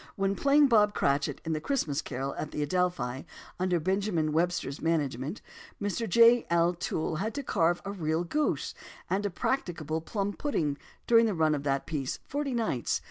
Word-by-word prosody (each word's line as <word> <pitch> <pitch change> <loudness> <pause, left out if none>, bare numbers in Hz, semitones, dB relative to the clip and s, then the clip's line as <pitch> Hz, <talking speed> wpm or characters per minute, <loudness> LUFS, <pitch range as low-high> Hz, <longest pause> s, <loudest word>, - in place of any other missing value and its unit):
When 195 0 0
playing 285 +4 +5
Bob 210 -4 +4
Cratchit, 140 0 0
in 160 - -1
The 155 - -2
Christmas 160 - -1
Carol 135 +1 -4
at 155 - -5
the 150 - -2
Adelphi, 145 -6 -1 0.4
under 180 -1 +1
Mr. - - -9
Benjamin 185 -4 0
Webster's 165 -3 -1
management, 150 - -1 0.4
Mr. 205 +2 -2
J. 235 +4 +6
L. 170 +1 +3
Toole 160 -2 -2
had 215 - -3
to 285 - -3
carve 175 -7 +1
a 200 - -3
real 160 -3 -1
goose 300 - -1 0.4
and 200 +2 +1
a - - -3
"practicable" 165 - -2
plum 200 +4 -2
pudding 155 - -1 0.3
during 230 -1 +5
the 210 - -1
run 160 -2 +3
of 145 - -1
that 135 -1 0
piece, 140 -5 -3
forty 280 -2 -2
nights. 220 - 0
175 Hz, 180 wpm, -29 LUFS, 155-210 Hz, 0.4 s, J